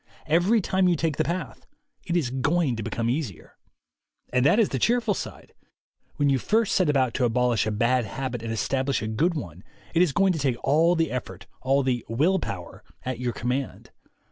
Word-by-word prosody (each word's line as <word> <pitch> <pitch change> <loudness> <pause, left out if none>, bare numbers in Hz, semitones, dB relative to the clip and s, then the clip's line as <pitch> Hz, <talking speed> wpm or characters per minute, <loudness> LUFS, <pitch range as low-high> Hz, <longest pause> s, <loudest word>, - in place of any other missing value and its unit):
Every 175 +8 +3
time 190 0 +1
you 175 - +3
take 160 -2 -1
the 155 - +2
path 175 +3 -5 0.4
it 175 0 +1
is 135 -8 -1
going 140 +1 +1
to 110 - -4
become 115 +2 -2
easier. 120 - -4 0.7
And 125 -1 +3
that 140 +9 +4
is 225 -4 +3
the 130 - -2
cheerful 235 - +2
side. - - -8 0.6
When 145 -1 +1
you 135 -2 +3
first 220 - +1
set 185 -5 +2
about 130 -5 +2
to 130 - -1
abolish 120 -1 +2
a - - 0
bad 120 +3 +1
habit 125 +3 -4
and 115 0 -4
establish 130 +4 -1
a - - -2
good 160 +11 +1
one, 90 - -7 0.3
it 170 - +3
is 180 -5 +3
going 195 +5 +3
to 160 - -3
take 130 -4 0
all 160 +5 +3
the 165 -2 0
effort, 125 - -5 0.2
all 135 +2 +2
the 125 -3 0
"will 160 +12 +2
power," 90 - -7 0.2
at 130 -2 -3
your 125 -1 -1
command. 125 +2 -3
135 Hz, 200 wpm, -25 LUFS, 120-170 Hz, 0.7 s, that